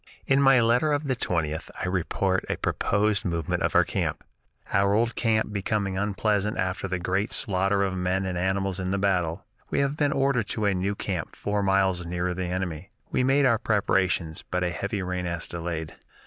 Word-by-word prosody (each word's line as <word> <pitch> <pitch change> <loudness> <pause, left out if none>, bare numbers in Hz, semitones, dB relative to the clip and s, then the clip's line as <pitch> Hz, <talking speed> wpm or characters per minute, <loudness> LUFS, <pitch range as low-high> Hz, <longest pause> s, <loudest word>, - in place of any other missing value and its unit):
In 135 +1 +3
my 135 -2 +6
letter 120 +7 +3
of 145 0 -1
the 130 - +1
20th, 80 -8 -2
I - - -2
report 95 +1 0
a - - 0
proposed 100 0 +1
movement 85 -3 -1
of - - 0
our - - +7
camp: - - -2 0.5
"Our 100 +1 +3
old 115 +2 +1
camp 110 -2 +1
becoming 100 -1 -1
unpleasant 105 +1 0
after 95 +1 -1
the 95 0 -1
great 95 +4 -1
slaughter 100 +1 +1
of 95 -1 -1
men 95 +1 0
and 95 -1 -2
animals 95 +1 0
in 95 0 -2
the 100 - 0
battle, 90 -4 0 0.2
we - - -1
have 140 +1 0
been 145 -2 +2
ordered 135 -6 +1
to 110 - -1
a 100 - +3
new 95 +2 -1
camp 90 -5 -4
four 105 0 -1
miles 95 -2 +2
nearer 90 +1 -2
the 95 0 -3
enemy. 90 -1 -3 0.2
We - - +1
made 135 +2 +4
our 115 -4 +4
preparations, 95 -7 0
but 90 0 0
a 90 - 0
heavy 100 +3 -3
rain 90 0 -3
has 85 -2 -3
delayed. 85 -2 -4
95 Hz, 195 wpm, -26 LUFS, 90-105 Hz, 0.5 s, our